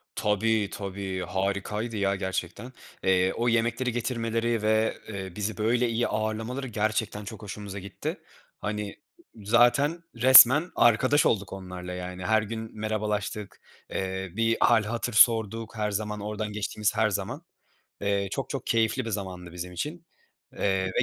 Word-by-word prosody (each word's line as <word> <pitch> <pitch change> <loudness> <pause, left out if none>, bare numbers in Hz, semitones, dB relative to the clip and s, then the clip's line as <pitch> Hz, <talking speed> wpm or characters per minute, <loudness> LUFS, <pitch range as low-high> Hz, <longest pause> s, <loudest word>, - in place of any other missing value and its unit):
Tabii, 105 0 +1
tabii, 95 -1 -5
harikaydı, 100 +4 -2
ya, 100 0 +1
gerçekten. 95 +5 -4 0.3
Eee, 95 0 +3
o 120 +1 -1
yemekleri 120 +2 +1
getirmeleri 115 -1 -1
ve, 110 +1 +2
eee, 95 -3 -6
bizi 105 +1 -3
böyle 120 +3 +2
iyi 115 +1 0
ağırlamaları 110 +5 -2
gerçekten 110 -1 -1
çok 100 - -8
hoşumuza 100 -1 -7
gitti. 95 0 -5 0.4
Hani, 105 0 -3 0.4
zaten 120 +10 +3
resmen 130 +6 +8
arkadaş 130 +5 +4
olduk 100 -2 +1
onlarla, 90 -1 -7
yani. 90 0 -6
Her 110 +1 +3
gün 110 0 -6
merhabalaştık, 105 -1 -3 0.3
eee, 95 0 -3
bir 115 0 +2
hâl 115 -2 +4
hatır 115 +2 -3
sorduk 115 0 +4
her 105 -1 -1
zaman, 105 +1 -3
oradan 105 0 -4
geçtiğimiz 105 0 -1
her 110 0 +3
zaman. 105 - -3 0.6
Eee, 100 -1 0
çok 135 - -4
çok 135 -3 -4
keyifli 115 +2 +1
bir 115 - -4
zamandı 95 -4 -5
bizim 90 +1 -6
için, 160 - -5 0.5
eee, 95 -1 0
ve 95 - 0
110 Hz, 145 wpm, -27 LUFS, 100-115 Hz, 0.6 s, resmen